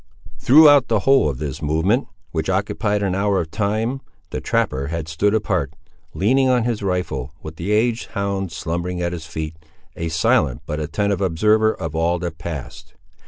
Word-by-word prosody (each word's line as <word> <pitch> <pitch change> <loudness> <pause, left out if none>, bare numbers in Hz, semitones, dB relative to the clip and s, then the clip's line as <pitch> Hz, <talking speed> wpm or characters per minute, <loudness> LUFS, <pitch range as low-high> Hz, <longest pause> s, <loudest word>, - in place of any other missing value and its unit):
Throughout 145 0 +7
the 110 -3 +1
whole 135 - +4
of 65 - -4
this 70 -1 -5
movement, 80 - +1 0.2
which 80 +2 -2
occupied 105 +2 0
an 95 -2 0
hour 100 0 +1
of 80 -2 -4
time, 110 +5 -1 0.3
the - - -3
trapper 70 +1 0
had 80 0 -4
stood 100 +7 +1
apart, 110 - -1 0.4
leaning 130 +6 +3
on 125 -2 +3
his 115 -2 -1
rifle, 80 -8 -2
with 80 +1 -8
the 90 +5 -3
aged 115 +2 +1
hound 100 -2 -2
slumbering 85 +3 -3
at 85 0 -1
his 85 -2 -7
feet, 80 -2 -5 0.4
a 85 0 -3
silent 65 -5 +1
but 75 +1 -3
attentive 95 +6 -1
observer 105 +5 +3
of 80 -2 -5
all 85 +2 +1
that 85 -2 -5
passed. 80 -5 -7
90 Hz, 170 wpm, -21 LUFS, 80-105 Hz, 0.4 s, Throughout